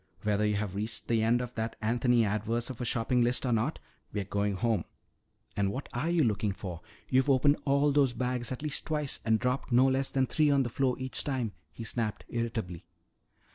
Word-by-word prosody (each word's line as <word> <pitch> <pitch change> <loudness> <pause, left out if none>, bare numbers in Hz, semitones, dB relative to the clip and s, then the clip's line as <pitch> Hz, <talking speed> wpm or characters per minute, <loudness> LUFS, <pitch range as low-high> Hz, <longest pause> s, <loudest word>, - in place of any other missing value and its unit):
Whether 105 0 +2
you 105 - +1
have 100 -2 -2
reached 105 +2 -5
the 115 -1 +2
end 115 +2 +3
of 125 0 -5
that 115 0 -3
Anthony 120 +1 +2
Adverse 110 +4 -1
of 125 - -8
a - - -1
shopping 120 +2 +1
list 120 +2 +1
or 125 - +1
not, 120 +7 +1 0.3
we're 105 - -2
going 100 +1 -1
home! 110 -3 +1 0.7
And 100 -1 +1
what 135 +6 -5
are 140 +7 -1
you 170 -2 +3
looking 105 -3 +1
for? 90 -4 -7 0.3
You've 130 +2 +2
opened 140 +2 +4
all 140 +1 +3
those 140 -3 +3
bags 125 -1 -2
at 130 +3 -5
least 150 -1 -3
twice 150 -3 -1
and 110 -1 +3
dropped 125 +3 -1
no 125 +2 +6
less 135 +1 +2
than 130 -1 +1
three 150 +2 +2
on 140 -1 +4
the 120 - -3
floor 130 +1 +1
each 130 0 0
time," 130 -6 -1 0.2
he 115 - -8
snapped 110 -1 -2
irritably. 115 -7 -3
120 Hz, 210 wpm, -30 LUFS, 110-130 Hz, 0.7 s, no